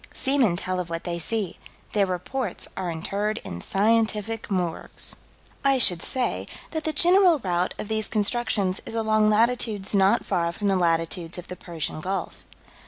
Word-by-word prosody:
Seamen 260 -9 +2
tell 185 +1 -2
of 175 -2 -4
what 165 0 -4
they 170 -1 -3
see: 195 +1 0 0.3
their 200 -2 +3
reports 185 +5 -3
are 185 -2 -3
interred 200 +6 -2
in 85 - -6
scientific 220 - +1
morgues. 180 -4 -2 0.5
I 275 -1 +4
should 180 -9 +5
say 255 +6 -1 0.2
that 315 -1 -4
the 315 - +1
general 350 +2 +5
route 180 -6 -1
of - - -5
these 220 -1 0
constructions 205 -3 0
is - - -6
along 215 -1 +3
latitudes 220 -2 +2
not 200 +3 +3
far 170 -1 0
from 205 - -5
the 195 -1 +3
latitudes 165 0 0
of 180 - -9
the 180 - -5
Persian 165 -3 -5
Gulf. 190 +4 -4
200 Hz, 165 wpm, -25 LUFS, 180-225 Hz, 0.5 s, should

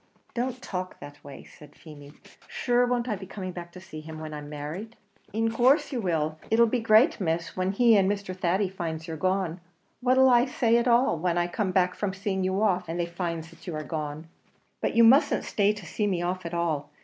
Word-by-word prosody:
"Don't 250 +1 -2
talk 185 -4 -5
that 145 0 -12
way," 140 -1 -10
said 150 -1 -16
Feemy. 145 -2 -13 0.3
"Shure, 245 0 +1
won't 245 -1 0
I 215 - 0
be 190 -1 -9
coming 185 -2 -6
back 175 -1 -8
to 185 - -10
see 175 -4 -9
him 155 0 -9
when 155 -1 -7
I'm 150 -1 -7
married?" 155 +10 -6 0.4
"In 225 +1 0
course 255 +8 +3
you 250 -4 -2
will; 155 -4 -1
but - - -20
it'll 235 +1 +6
be 240 +2 0
a - - -5
great 225 +6 +4
miss, 165 -1 -2
when 185 +1 0
he 230 +2 +5
and 195 -1 +4
Mr. 200 -2 -4
Thady 185 +2 +1
finds 165 -3 -5
you're 165 - -4
gone. 185 0 -1 0.4
What'll 260 +1 +4
I 240 0 +5
say 235 -4 +2
at 235 +1 +1
all, 240 - +3
when 175 +1 0
I 175 - +2
come 190 +3 -2
back 180 -1 +2
from 195 -2 -3
seeing 195 -1 -2
you 190 +3 0
off 180 -4 +1
and 170 +2 -3
they 175 - +1
finds 170 -1 -4
that 165 - -17
you 170 - -4
are 155 - -4
gone?" 155 0 -5 0.5
"But - - -1
you 230 - +6
mustn't 275 +6 +5
stay 205 0 +2
to 210 -3 -8
see 210 +5 -2
me 180 -3 -1
off 180 0 -2
at 170 - -8
all. 160 -4 -1
185 Hz, 230 wpm, -27 LUFS, 165-225 Hz, 0.5 s, it'll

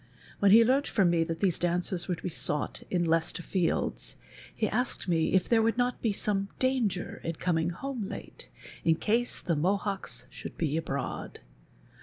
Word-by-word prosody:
When 200 - +5
he 225 +3 +8
learnt 270 +4 +2
from 190 -6 +3
me 165 -1 +3
that 165 0 -4
these 185 -4 +2
daneers 175 0 +2
were 180 - 0
to 165 - -15
he - - -1
sought 150 -2 -2
in 175 -2 +1
Leieestcr 165 +1 +1
Fields, 180 -2 -1 0.4
he 215 - 0
asked 245 0 -2
me 165 -2 +1
if 190 - +3
there 230 -1 +4
would 225 +1 +1
not 245 0 0
be 225 - +1
some 200 -1 -1
danger 245 -9 0
in 165 - -3
coming 165 -1 0
home 235 +3 -4
late, - - -9 0.3
in 165 - +4
case 230 +7 0
the 170 - +1
Mohoeks 195 +5 -1
should - - -8
be 155 -3 0
abroad. 145 -4 -4
185 Hz, 180 wpm, -29 LUFS, 165-220 Hz, 0.4 s, he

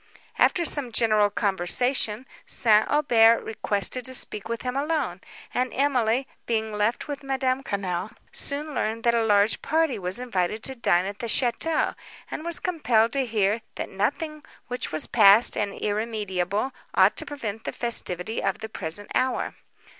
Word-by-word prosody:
After 345 - +3
some 280 -6 +3
general 215 -2 +3
conversation, 210 +5 0 0.2
St. 220 -2 +3
Aubert 230 -6 +4
requested 220 +3 -1
to 260 - -3
speak 210 -3 0
with 230 0 -4
him 250 0 -3
alone; 280 - -1 0.3
and 250 0 0
Emily, 260 -2 +1 0.2
being 220 -2 -1
left 210 +6 -1
with 285 -2 -5
Madame 265 -1 -1
Quesnel, 195 -5 -3 0.2
soon 295 +2 -2
learned 225 -2 -2
that 235 - +3
a 230 -1 +2
large 205 0 +3
party 315 -7 0
was 185 +1 -2
invited 215 -4 -2
to 265 - -3
dine 185 -7 +1
at 200 +1 -6
the 235 - -4
château, 255 +7 +1 0.4
and 310 - -5
was 335 -3 +1
compelled 240 -10 +1
to 270 -2 0
hear 215 0 +1
that - - -5
nothing 295 +9 -2 0.3
which 250 0 -2
was 155 - -2
past 215 +1 +6
and 205 -1 -3
irremediable 210 0 -2 0.2
ought - - +5
to - - -1
prevent 225 -7 -6
the - - -2
festivity 220 -4 0
of 195 +1 -1
the 220 0 -7
present 190 0 -4
hour. 255 0 0
230 Hz, 160 wpm, -25 LUFS, 205-260 Hz, 0.4 s, past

